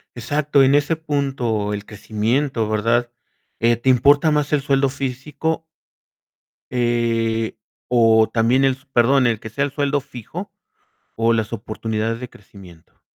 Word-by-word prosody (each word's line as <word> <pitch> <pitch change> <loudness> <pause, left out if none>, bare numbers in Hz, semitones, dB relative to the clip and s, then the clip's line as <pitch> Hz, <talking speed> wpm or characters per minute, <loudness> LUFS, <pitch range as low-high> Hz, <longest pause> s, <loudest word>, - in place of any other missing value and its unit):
Exacto, 145 +4 +1
en 135 +1 +5
ese 145 +3 +1
punto, 135 -9 -2
el 100 0 -5
crecimiento, 110 +4 -1
¿verdad? 115 +3 +1 0.5
eh, 115 0 +3
¿te 120 +3 0
importa 140 +5 +5
más 150 -1 0
el 150 -2 +2
sueldo 135 0 +1
físico? 140 +4 -3 1.1
Eh, 115 -2 0 0.3
o 115 -2 +4
también 120 +4 +3
el 135 - +4
s 130 +2 -15
perdón, 125 +2 +4
el 115 -2 -1
que 110 - -7
sea 140 +6 -1
el 140 - -6
sueldo 145 0 0
fijo 125 -4 -9 0.6
o 115 +1 +2
las 110 0 -1
oportunidades 110 +1 -3
de 125 - -6
crecimiento. 95 -6 -17
120 Hz, 140 wpm, -20 LUFS, 115-140 Hz, 1.1 s, en